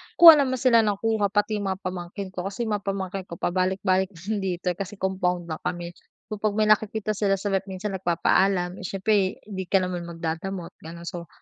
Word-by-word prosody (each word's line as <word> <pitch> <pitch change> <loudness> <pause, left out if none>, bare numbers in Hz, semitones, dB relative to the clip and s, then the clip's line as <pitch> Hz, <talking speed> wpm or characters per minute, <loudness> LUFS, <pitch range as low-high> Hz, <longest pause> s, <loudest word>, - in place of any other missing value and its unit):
kuha 330 -3 +10
naman 260 -2 +1
sila 245 -2 +4
ng 210 -2 +2
kuha 220 -2 +2
pati 205 +1 0
mga 195 -1 -3
pamangkin 185 +1 -5
ko. 185 0 -4
Kasi 200 +4 -4
mga 215 -2 -1
pamangkin 195 -1 -4
ko 170 - -7
pabalik-balik 185 +2 +1
din 200 +6 -3
dito, 180 -2 -1
kasi 195 +3 -6
compound 180 -3 -1
lang 155 - -4
kami. 175 -1 -4 0.4
So 210 - -4
pag 210 -1 0
may 215 - +3
nakikita 215 0 +2
sila 200 -1 +1
sa 195 +1 -3
ref, 195 0 0
minsan 195 +2 -4
nagpapaalam, 180 +1 +1
eh, 185 - -7
siyempre 195 0 +1
hindi 190 -3 -6
ka 190 0 +3
naman 180 -1 -4
magdadamot, 170 +2 -4
gano'n. 170 +1 -10
So 170 0 -6
190 Hz, 195 wpm, -25 LUFS, 180-205 Hz, 0.4 s, kuha